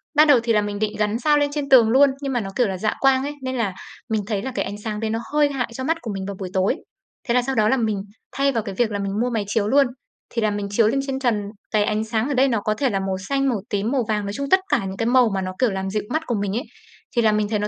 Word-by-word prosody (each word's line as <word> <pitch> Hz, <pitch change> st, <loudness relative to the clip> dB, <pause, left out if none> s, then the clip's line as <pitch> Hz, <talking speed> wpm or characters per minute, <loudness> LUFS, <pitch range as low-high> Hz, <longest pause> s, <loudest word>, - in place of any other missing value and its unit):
ban 305 Hz, +1 st, +6 dB
đầu 285 Hz, -4 st, +6 dB
thì 230 Hz, -, +1 dB
là 210 Hz, -, +3 dB
mình 205 Hz, 0 st, -4 dB
định 215 Hz, -1 st, 0 dB
gắn 210 Hz, +2 st, 0 dB
sao 295 Hz, +3 st, +3 dB
lên 290 Hz, 0 st, +2 dB
trên 285 Hz, -2 st, -3 dB
tường 240 Hz, -4 st, +7 dB
luôn, 275 Hz, +4 st, +6 dB
nhưng 275 Hz, -2 st, -2 dB
mà 245 Hz, -, +1 dB
nó, 195 Hz, -, -5 dB
kiểu 245 Hz, -4 st, +2 dB
là, 190 Hz, -, -3 dB
dạ 215 Hz, +3 st, 0 dB
quang 270 Hz, -1 st, +3 dB
ấy, 290 Hz, +1 st, -3 dB
nên 260 Hz, 0 st, -3 dB
là 210 Hz, -6 st, -1 dB, 0.4 s
mình 220 Hz, -1 st, 0 dB
thấy 205 Hz, -3 st, -1 dB
là 265 Hz, -, -4 dB
cái -, -, 0 dB
ánh 205 Hz, -, -5 dB
sáng 210 Hz, -2 st, -3 dB
đấy 220 Hz, -1 st, -2 dB
nó 225 Hz, +1 st, -1 dB
hơi 295 Hz, -1 st, +4 dB
hại 245 Hz, -4 st, -2 dB
cho 260 Hz, -, -4 dB
mắt 325 Hz, +4 st, +1 dB
của 220 Hz, -, -5 dB
mình 195 Hz, -1 st, -4 dB
vào 200 Hz, 0 st, -5 dB
buổi 185 Hz, -2 st, -4 dB
tối. 190 Hz, +6 st, +2 dB, 0.5 s
Thế 235 Hz, -, +2 dB
là 250 Hz, -, +4 dB
sau 265 Hz, +1 st, -3 dB
đó 215 Hz, -1 st, +3 dB
là 265 Hz, -, +3 dB
mình 215 Hz, -5 st, -1 dB, 0.3 s
thay 275 Hz, 0 st, +1 dB
vào 230 Hz, -4 st, -1 dB
cái 195 Hz, -2 st, -6 dB
việc 220 Hz, +1 st, +1 dB
là 205 Hz, -, -2 dB
mình 200 Hz, 0 st, -2 dB
mua 250 Hz, -, +1 dB
máy 220 Hz, -3 st, -1 dB
chiếu 210 Hz, -1 st, 0 dB
luôn, 275 Hz, +2 st, +4 dB, 0.4 s
thì 230 Hz, -, -2 dB
là 215 Hz, -, +2 dB
mình 205 Hz, -1 st, -3 dB
chiếu 215 Hz, +1 st, +3 dB
lên 275 Hz, +5 st, +1 dB
trên 265 Hz, 0 st, -2 dB
trần, 235 Hz, -6 st, +1 dB, 0.3 s
cái 210 Hz, -2 st, +3 dB
ánh 215 Hz, +1 st, 0 dB
sáng 220 Hz, +2 st, -1 dB
ở 290 Hz, -, -1 dB
đây 265 Hz, +1 st, +4 dB
nó 230 Hz, -4 st, +1 dB
có 215 Hz, -, 0 dB
thể 265 Hz, +4 st, 0 dB
là 195 Hz, -4 st, -1 dB
màu 190 Hz, -1 st, -2 dB
xanh, 275 Hz, -1 st, +1 dB
màu 215 Hz, -6 st, -1 dB
tím, 205 Hz, +3 st, -1 dB
màu 265 Hz, -3 st, +1 dB
vàng, 210 Hz, -2 st, -1 dB
nói 200 Hz, -, -4 dB
chung, 280 Hz, +4 st, -4 dB
tất 375 Hz, -, +6 dB
cả 265 Hz, -10 st, +1 dB
những 190 Hz, 0 st, -5 dB
cái 225 Hz, -, -1 dB
màu 245 Hz, -1 st, +4 dB
mà 190 Hz, -, -1 dB
nó, 185 Hz, 0 st, -4 dB
kiểu, 250 Hz, -5 st, +3 dB
làm 190 Hz, 0 st, -3 dB
dịu 210 Hz, +2 st, -2 dB
mắt 315 Hz, +1 st, -1 dB
của 240 Hz, -, 0 dB
mình 195 Hz, -1 st, -2 dB
ấy, 245 Hz, -, -2 dB, 0.5 s
thì 235 Hz, -, +4 dB
là 220 Hz, -1 st, +4 dB
mình 210 Hz, -1 st, 0 dB
thấy 210 Hz, -2 st, 0 dB
nó 210 Hz, -, -1 dB
225 Hz, 335 wpm, -22 LUFS, 205-265 Hz, 0.5 s, tường